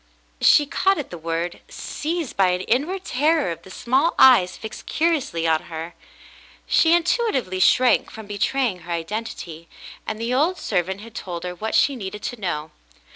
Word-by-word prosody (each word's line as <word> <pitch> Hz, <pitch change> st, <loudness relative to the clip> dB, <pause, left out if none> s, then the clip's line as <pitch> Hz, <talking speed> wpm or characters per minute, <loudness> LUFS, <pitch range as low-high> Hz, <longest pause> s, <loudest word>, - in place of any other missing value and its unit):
She 295 Hz, -, +6 dB
caught 385 Hz, +7 st, +1 dB
at 295 Hz, -, -5 dB
the 175 Hz, -, -6 dB
word. 165 Hz, +2 st, -3 dB
Seized 320 Hz, -2 st, -4 dB
by 195 Hz, -1 st, +4 dB
an 180 Hz, 0 st, 0 dB
inward 305 Hz, -, -1 dB
terror 300 Hz, -, +1 dB
of 165 Hz, -, -7 dB
the 190 Hz, -, -15 dB
small 260 Hz, -, +1 dB
eyes 190 Hz, -9 st, +6 dB
fixed 220 Hz, -, -9 dB
curiously 305 Hz, -, 0 dB
on 160 Hz, -1 st, +1 dB
her, 165 Hz, +1 st, -7 dB, 0.7 s
she 330 Hz, +1 st, +4 dB
intuitively 335 Hz, -, 0 dB
shrank 250 Hz, +6 st, +4 dB
from 220 Hz, -1 st, -10 dB
betraying 210 Hz, +1 st, -1 dB
her 175 Hz, 0 st, -10 dB
identity, 170 Hz, -2 st, -5 dB, 0.4 s
and 215 Hz, 0 st, -4 dB
the 230 Hz, +2 st, -2 dB
old 320 Hz, +8 st, +2 dB
servant 190 Hz, -, -2 dB
had 230 Hz, +1 st, -12 dB
told 175 Hz, -6 st, -6 dB
her 180 Hz, 0 st, -4 dB
what 215 Hz, +5 st, -3 dB
she 280 Hz, -, +3 dB
needed 210 Hz, -2 st, -7 dB
to 245 Hz, -3 st, -5 dB
know. 155 Hz, -4 st, -3 dB
215 Hz, 170 wpm, -22 LUFS, 175-280 Hz, 0.7 s, She